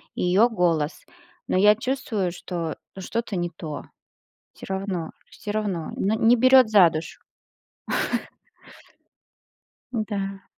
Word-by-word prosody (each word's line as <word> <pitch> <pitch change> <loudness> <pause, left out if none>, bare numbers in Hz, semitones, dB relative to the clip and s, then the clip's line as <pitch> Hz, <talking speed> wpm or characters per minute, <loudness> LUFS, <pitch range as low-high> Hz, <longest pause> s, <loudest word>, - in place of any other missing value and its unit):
её 190 +7 +3
голос, 170 -7 0 0.4
но - - +1
я 210 +2 +6
чувствую, 225 -6 -2
что 170 -2 -4 0.2
что-то 225 +3 -3
не 175 -1 -1
то. 155 -3 -7 0.7
Всё - - -11
равно 190 -4 -3 0.2
всё 205 - -7
равно. 205 -6 -2
Ну, 205 +3 0
не 235 +1 +5
берёт 255 0 +6
за 200 -5 +7
душу. 155 0 -6 2.7
Да. 200 -4 -3
195 Hz, 110 wpm, -24 LUFS, 175-220 Hz, 2.7 s, за